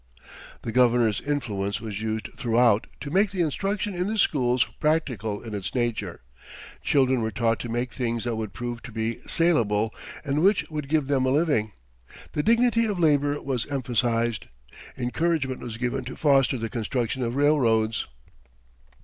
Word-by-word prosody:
] - - -16
"The 115 - -3
Governor's 120 -3 +3
influence 105 -8 -2
was 105 -2 -5
used 110 0 -3
throughout 115 -2 +2
to 145 - -5
make 195 +4 +3
the 185 -3 0
instruction 195 +6 -2
in 180 +1 -1
the 220 +1 -2
schools 125 - +3 0.2
practical 125 - 0
in 115 -2 -7
its 95 0 -4
nature; 110 -7 -2 0.6
children 130 -3 +2
were 110 - 0
taught 115 +1 0
to 120 - -5
make 120 +1 -2
things 115 -3 -2
that 120 -2 -1
would 110 -2 -4
prove 120 -1 -5
to 125 - -10
be 115 +1 -2
salable 110 -11 +2 0.3
and 145 +1 0
which 195 +3 +3
would 150 -3 -4
give 155 -2 +2
them 135 -2 +1
a - - +3
living. 135 -8 +1 0.6
The 150 - 0
dignity 230 +3 +3
of 205 -3 -2
labour 145 -3 +2
was 130 -4 -2
emphasized. 120 -5 0 0.5
Encouragement 130 +1 -1
was 115 -2 -6
given 125 +2 -2
to 125 - -6
foster 135 -3 +3
the 115 -1 -3
construction 120 +2 -2
of 120 0 -1
railroads. 120 -7 +2
125 Hz, 165 wpm, -25 LUFS, 115-145 Hz, 0.6 s, Governor's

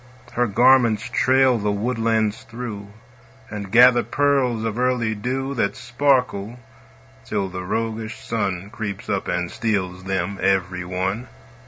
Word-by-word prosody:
Her 120 0 +1
garments 120 0 +4
trail 130 -2 +3
the 105 0 0
woodlands 110 0 0
through, 110 -4 -7 0.6
And 100 -2 -6
gather 120 +1 +7
pearls 135 -5 +1
of 115 +1 -2
early 125 -3 +1
dew 130 +5 -3
That 100 -5 0
sparkle, 120 -4 0 0.7
till 95 +9 -2
the 90 0 -6
roguish 110 +3 -3
Sun 100 -3 -3
Creeps 105 -2 -6
up 100 -2 -1
and 90 -1 -2
steals 95 -5 -2
them 95 0 -2
every 95 -2 +1
one. 95 +6 -3
110 Hz, 130 wpm, -22 LUFS, 100-125 Hz, 0.7 s, gather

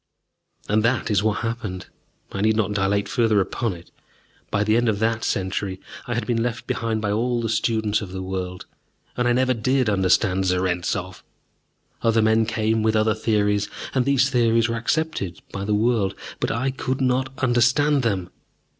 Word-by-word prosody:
And 105 +1 +2
that 120 0 +1
is 100 -2 +3
what 110 -1 0
happened. 115 -6 -4 0.5
I 100 - -3
need 110 +1 +3
not 105 -2 0
dilate 100 0 +1
further 110 -1 +2
upon 110 +3 -1
it. 85 0 -13 0.6
By 100 - +1
the 110 +1 +2
end 120 0 +2
of 105 - 0
that 110 +1 0
century 95 0 -2 0.3
I 120 - -2
had 115 - -2
been 115 -2 0
left 120 0 -3
behind 110 -2 -2
by 105 - 0
all 120 +3 0
the 115 -1 -2
students 110 -1 0
of 100 -3 -7
the 95 0 -5
world, 90 -1 -5 0.5
and 125 0 +1
I - - +3
never 130 +1 +2
did 125 0 +1
understand 95 -1 +2
Zarentzov. 90 0 -1 0.8
Other 115 -1 +3
men 110 0 +3
came 110 0 0
with 110 0 +1
other 110 0 +3
theories, 105 -1 +1 0.2
and 130 - +2
these 140 -1 +3
theories 115 -2 +3
were 115 - -2
accepted 115 - -2
by 100 0 -4
the 105 0 +1
world. 105 -3 +1 0.2
But - - -1
I 130 +4 0
could 130 0 -3
not 130 0 +1
understand 130 +4 +3
them. 95 -7 -1
110 Hz, 180 wpm, -23 LUFS, 100-120 Hz, 0.8 s, is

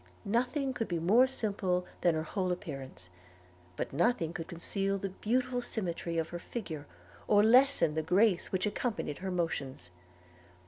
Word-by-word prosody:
Nothing 255 +5 0
could 225 -3 -2
be 175 - -1
more 210 +11 +5
simple 195 -7 -1 0.2
than 175 -2 +3
her 155 - -1
whole 185 +2 -1
appearance; 135 - -6 0.7
but - - -4
nothing 170 - +1
could 165 -2 -5
conceal 195 +3 -1
the 195 0 -3
beautiful 245 +6 -1
symmetry 175 -7 -3
of 165 0 -1
her 175 - -5
figure, 160 -10 -6 0.4
or 205 -1 +5
lessen 245 - +5
the 160 - 0
grace 185 +4 +2
which 185 +1 0
accompanied 210 - -2
her 190 - -4
motions. 140 - -3
185 Hz, 150 wpm, -31 LUFS, 165-225 Hz, 0.7 s, more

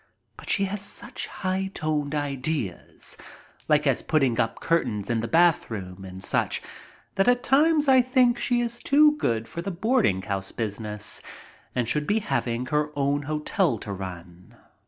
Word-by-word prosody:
But - - -11
she 200 - +3
has 195 +1 -2
such 200 - -3
high 190 0 -2
toned 150 -2 -1
ideas, 140 - -3 0.5
like 150 0 +4
as 135 -4 +2
putting 135 -7 +1
up 115 - 0
curtains 115 -10 0
in 115 - +1
the 115 - -2
bathroom 110 - +1
and 95 0 -9
such - - 0 0.5
that 195 - +1
at 245 0 +3
times 300 +3 +4
I 260 -1 +7
think 250 -1 +3
she 240 -1 +1
is 235 0 -3
too 300 +1 +5
good 115 - -1
for 170 - -6
the 195 - -4
boarding 195 - +1
house 95 -2 -3
business 105 -1 -3 0.5
and 125 -2 0
should 150 +4 0
be 210 - +2
having 125 - -1
her 150 +3 0
own 140 +1 +1
hotel 155 - 0
to 100 -1 -6
run. 90 -2 -9
150 Hz, 160 wpm, -25 LUFS, -, 0.5 s, I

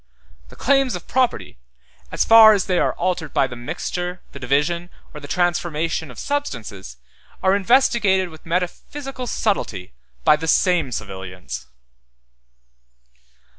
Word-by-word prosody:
The - - -14
claims 270 -3 +2
of 180 - -8
property, 250 - -1 0.5
as - - +1
far 225 -1 +9
as 200 -3 0
they 180 -2 +1
are - - +1
altered 175 -4 -2
by - - +4
the 130 -2 -7
mixture, 175 +9 -4
the - - -10
division, 150 +7 0 0.2
or 150 - -8
the 145 - -10
transformation 165 -1 -1
of 125 - -12
substances, 115 - -4 0.5
are 190 +1 +4
investigated 205 -4 +3
with 160 -1 -14
metaphysical 250 - -4
subtilty 110 - -2 0.3
by 150 - +5
the 160 +1 -5
same 165 -4 +2
civilians. 95 -4 -7
175 Hz, 130 wpm, -21 LUFS, 140-205 Hz, 0.5 s, far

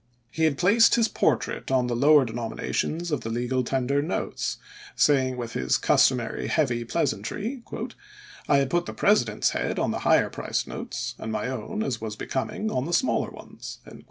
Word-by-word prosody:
He 160 - +1
had 150 -3 +1
placed 205 +7 +5
his 230 -1 +3
portrait - - 0
on 130 -2 +2
the 120 -1 -1
lower 145 +2 +6
denominations 120 +8 -3
of 150 - 0
the 115 - -5
legal 125 +2 -1
tender 135 +3 0
notes, 160 +5 -2 0.4
saying 130 -3 +3
with 120 -2 -5
his 65 - +1
customary - - +2
heavy 120 -6 +1
pleasantry, 210 - -2 0.4
" 415 0 -19
I 140 - +5
had 135 -1 +1
put 175 0 +1
the - - -6
President's 120 - +2
head - - -2
on - - +1
the - - -2
higher - - +3
priced - - -2
notes, - - -5
and 110 - -5
my 110 +2 -2
own, 130 - -3
as 120 - -3
was 110 -2 -4
becoming, 215 - -3
on 130 - -1
the 175 - -3
smaller 215 - +1
ones." - - -10
135 Hz, 180 wpm, -26 LUFS, 120-175 Hz, 0.4 s, lower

